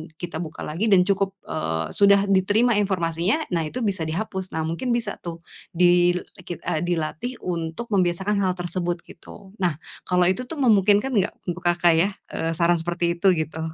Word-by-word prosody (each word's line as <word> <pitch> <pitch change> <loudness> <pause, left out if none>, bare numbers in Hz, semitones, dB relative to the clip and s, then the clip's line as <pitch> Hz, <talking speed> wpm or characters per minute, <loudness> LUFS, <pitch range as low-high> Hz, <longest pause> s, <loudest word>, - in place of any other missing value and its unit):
kita 170 -1 -6
buka 160 -2 -6
lagi 175 +9 -2
dan 195 -3 +6
cukup, 195 -1 0
eee, 80 - -3
sudah 200 0 +5
diterima 205 +5 +3
informasinya. 185 - 0
Nah, 170 -2 +1
itu 245 +10 -4
bisa 190 -5 -1
dihapus. 190 +2 -4
Nah, 160 - -1
mungkin 205 +10 -2
bisa 225 -4 -3
tuh 170 -1 -8 0.3
dil 175 0 +4 0.2
e - - -10
kit 175 - -5
eee, 155 - -1
dilatih 175 +8 -2
untuk 170 +6 -4
membiasakan 190 +2 +1
hal 185 -2 +1
tersebut 175 -1 -3
gitu. 195 +3 -13
Nah, 175 -5 +1 0.3
kalau 180 0 +3
itu 245 +7 -3
tuh 325 - -6
memungkinkan 210 0 +4
enggak 200 -2 +1
untuk 175 +1 -3
Kakak 175 -1 +4
ya? 195 +4 +3 0.2
Eee, 165 0 -2
saran 170 +1 +3
seperti 170 +1 -1
itu, 195 - +2
gitu. 160 0 -3
180 Hz, 180 wpm, -23 LUFS, 170-200 Hz, 0.3 s, dan